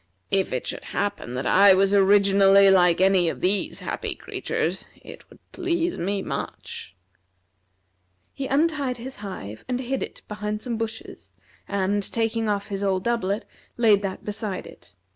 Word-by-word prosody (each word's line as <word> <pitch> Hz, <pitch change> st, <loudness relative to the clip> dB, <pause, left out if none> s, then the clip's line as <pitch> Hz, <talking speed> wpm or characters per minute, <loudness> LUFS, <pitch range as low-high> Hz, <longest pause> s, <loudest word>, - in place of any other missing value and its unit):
If 195 Hz, -1 st, +1 dB
it 130 Hz, -, -2 dB
should -, -, -4 dB
happen 125 Hz, -11 st, -3 dB
that 130 Hz, -, -3 dB
I 195 Hz, 0 st, +7 dB
was 195 Hz, +1 st, +3 dB
originally 195 Hz, 0 st, +6 dB
like 180 Hz, -2 st, +4 dB
any 190 Hz, -2 st, +4 dB
of -, -, -5 dB
these 195 Hz, +2 st, 0 dB
happy -, -, -4 dB
creatures -, -, -3 dB
it -, -, -13 dB
would -, -, -17 dB
please 345 Hz, -1 st, -1 dB
me 195 Hz, +2 st, -2 dB
much." 95 Hz, -, -6 dB, 1.4 s
He 270 Hz, -, -4 dB
untied 285 Hz, -3 st, +1 dB
his 260 Hz, +3 st, -7 dB
hive, 145 Hz, -, -8 dB
and 250 Hz, 0 st, -1 dB
hid 265 Hz, +1 st, -2 dB
it -, -, -7 dB
behind 210 Hz, 0 st, -4 dB
some 245 Hz, -2 st, -2 dB
bushes, 225 Hz, 0 st, -6 dB, 0.4 s
and 200 Hz, +1 st, 0 dB
taking 225 Hz, +1 st, -1 dB
off 200 Hz, 0 st, -2 dB
his 200 Hz, -1 st, -3 dB
old 190 Hz, -2 st, 0 dB
doublet, 220 Hz, -3 st, -1 dB, 0.3 s
laid 215 Hz, -4 st, +4 dB
that 195 Hz, -2 st, -5 dB
beside 210 Hz, -2 st, -4 dB
it. -, -, -15 dB
200 Hz, 155 wpm, -24 LUFS, 190-230 Hz, 1.4 s, I